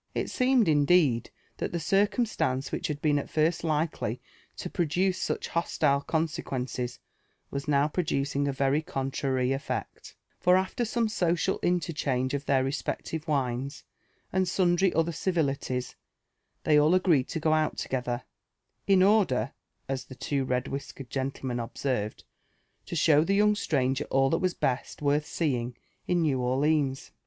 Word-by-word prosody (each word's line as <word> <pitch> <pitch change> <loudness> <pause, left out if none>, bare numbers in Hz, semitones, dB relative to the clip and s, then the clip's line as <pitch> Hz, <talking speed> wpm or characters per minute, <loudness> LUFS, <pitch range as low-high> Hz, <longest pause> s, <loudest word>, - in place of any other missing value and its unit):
It - - -2
seemed, 255 -4 +3
indeed, 145 -5 +3 0.3
that - - -3
the 170 - -2
circumstance 195 - +1
which - - -2
had 145 -2 -5
been 145 -2 +3
at - - -6
first 165 +2 +1
likely 155 -7 -1 0.4
to - - -4
produce 180 +3 0
such - - -2
hostile 140 -4 +1
consequences 130 -6 -2 0.5
was 140 +1 -4
now 145 0 +3
producing 140 -4 -1
a - - +1
very 135 +2 +1
contrary 135 -3 -1
eflect; 135 +1 -4 0.2
fur 180 0 +5
after 190 +6 0
some 230 +1 0
social 180 -2 0
interchange 145 -7 0
of 140 0 -3
their 135 -2 +3
respective 150 +3 -3
wines, 135 -1 -1 0.5
and 190 0 +2
sundry 180 0 +2
other 165 +1 +2
civilities, 140 -7 -1 0.7
they 150 -1 +5
all 155 +4 +4
agreed 170 -8 +3
to 165 - -3
go 155 0 +2
out 155 0 +1
together, 125 -1 -2 0.6
in 190 -2 +5
order, 205 0 +3 0.4
as 135 -1 -3
the 130 - -11
two 135 +2 -1
red 125 0 -1
whiskered 135 -1 -7
gentlemen 130 -2 -3
observed, 115 -2 -3 0.6
to - - -4
show 155 -2 +5
the 195 +4 +1
young 210 +1 +4
stranger 135 -8 0
all 135 0 +2
that 165 - +2
was 185 -1 0
best 130 +3 -2
worth 145 +1 +2
seeing 125 -6 -1 0.3
in 175 -1 +2
New 140 -5 +1
Orleans. 135 +2 +1
145 Hz, 145 wpm, -28 LUFS, 135-175 Hz, 0.7 s, fur